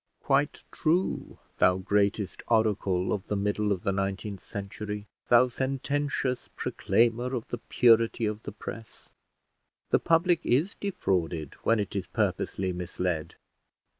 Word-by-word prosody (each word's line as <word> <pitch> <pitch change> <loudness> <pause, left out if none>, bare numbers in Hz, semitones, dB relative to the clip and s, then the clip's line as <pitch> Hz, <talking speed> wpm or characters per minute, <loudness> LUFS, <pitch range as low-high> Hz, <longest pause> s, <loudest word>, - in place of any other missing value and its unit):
Quite - - +1
true, 175 +4 0 0.2
thou 90 0 +5
greatest 100 +1 0
oracle 100 -5 +2
of 100 - -4
the 105 - -1
middle 105 +1 0
of 95 -3 -1
the 100 - +1
nineteenth 95 +1 -3
century, 105 +1 -6 0.2
thou 120 +1 +7
sententious 135 0 -2
proclaimer 120 +3 +1
of 115 - -4
the 120 - -4
purity 115 -1 +3
of 105 0 -2
the - - -6
press; 110 +1 -9 0.8
the - - +5
public 170 +1 +3
is 150 +11 +2
defrauded 85 - -2
when 115 -1 +3
it 100 -1 -3
is 95 -3 -2
purposely 95 -1 -1
misled. 90 -2 -3
105 Hz, 130 wpm, -28 LUFS, 95-125 Hz, 0.8 s, thou